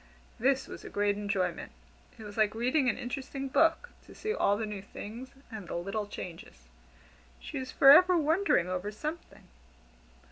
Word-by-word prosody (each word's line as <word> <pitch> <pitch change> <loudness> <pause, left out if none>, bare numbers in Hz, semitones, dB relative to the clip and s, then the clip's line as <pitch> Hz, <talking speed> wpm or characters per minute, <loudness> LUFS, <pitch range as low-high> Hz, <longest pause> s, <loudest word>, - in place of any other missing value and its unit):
This 265 +3 +2
was - - -9
a - - -8
great 205 0 +1
enjoyment. 200 -4 -2 0.5
It 220 - -10
was 205 -1 -9
like 215 -1 +2
reading 255 +4 +2
an 215 - -1
interesting 270 +2 -5
book 330 - +2 0.2
to - - -14
see 430 0 -2
all 205 - +2
the 220 - -2
new 210 -2 -6
things, 225 +5 -9 0.2
and 210 -5 -7
the - - -5
little 195 +4 -3
changes. 165 - -9 0.8
She - - -6
was 260 -1 -6
forever 350 +7 +7
wondering 320 - +2
over 185 +3 -3
something. 305 +10 -7
220 Hz, 165 wpm, -30 LUFS, 205-275 Hz, 0.8 s, forever